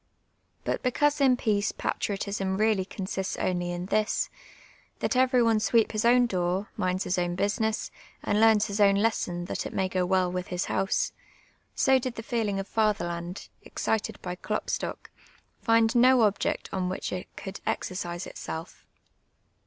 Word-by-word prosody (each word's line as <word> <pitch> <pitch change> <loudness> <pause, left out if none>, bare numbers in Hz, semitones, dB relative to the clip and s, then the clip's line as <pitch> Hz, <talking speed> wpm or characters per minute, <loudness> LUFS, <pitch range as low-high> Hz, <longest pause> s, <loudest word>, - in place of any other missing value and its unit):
Jlut - - -1
because 290 +3 +1
in 260 -2 +5
peace 210 -3 +1
j)atriotism 195 -1 -2
really 215 -3 +2
consists 190 -1 -4
only 175 -1 -1
in 175 0 -4
this, 215 +2 0 0.7
that - - -2
eveiT 255 -2 +4
one 225 -1 +3
sweeps 220 +1 +3
his 215 +2 0
own 245 +1 +6
door, 185 -1 -1
minds 185 +1 0
his 180 - 0
own' 175 0 -1
business, 215 +3 -1 0.3
and 210 +1 +1
learns 220 -1 +5
his 200 +1 -4
own 200 -1 +6
lesson, 190 -5 0
that - - -3
it - - -10
may 190 -1 +1
\:,o 185 -1 +2
well 185 0 +2
with 180 0 -3
hi.s 180 0 -2
house, 195 +1 0 0.3
— - - -30 0.3
so 265 -1 +4
did 255 -1 -4
the 225 - -6
feeling 220 -4 -1
for 195 - -1
fatherland, 185 -4 -1
excited 220 -1 -2
by 180 - -3
Klopstock, 210 +3 -3 0.5
find 225 -1 +3
no 250 0 +6
object 205 -1 0
on 185 -1 -1
which 185 - -4
it 185 - -4
could 195 -1 -7
exercise 175 -1 -3
itself. 160 +2 -7
200 Hz, 160 wpm, -27 LUFS, 185-225 Hz, 0.7 s, own